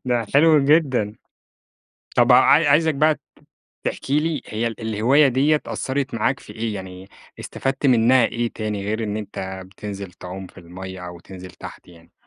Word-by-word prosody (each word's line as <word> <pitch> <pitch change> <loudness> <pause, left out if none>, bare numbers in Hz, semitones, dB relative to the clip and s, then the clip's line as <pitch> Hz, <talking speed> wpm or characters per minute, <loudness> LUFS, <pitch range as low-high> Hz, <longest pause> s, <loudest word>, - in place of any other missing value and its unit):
ده 120 -3 0
حلو 150 -1 +5
جدًا. 135 -9 +2 1.0
طب - - +5
ع - - +9 0.3
عايزك 155 +1 +3
بَقى 155 +1 +2 0.6
تحكي 140 +2 -1
لي 155 -3 -2
هي 115 +2 -2
ال 115 0 -8
الهواية 115 +7 +3
ديّة 140 +4 +2
أثرِت 135 0 -3
معاك 130 +3 0
في - - -13
إيه؟ 110 -1 -3
يعني 95 -1 -9 0.3
استفدت 135 +1 -3
منها 125 -1 +5
إيه 120 0 -2
تاني، 105 -2 -4
غير 110 +2 -2
إن 105 0 -3
أنت 95 -2 -6
بتنزل 100 0 -8
تعوم 90 +2 -9
في - - -21
المَيّة 90 +1 -9
أو 90 -1 -9
تنزل 90 +1 -11
تحت - - -11
يعني؟ 85 -1 -18
115 Hz, 160 wpm, -22 LUFS, 95-135 Hz, 1.0 s, ع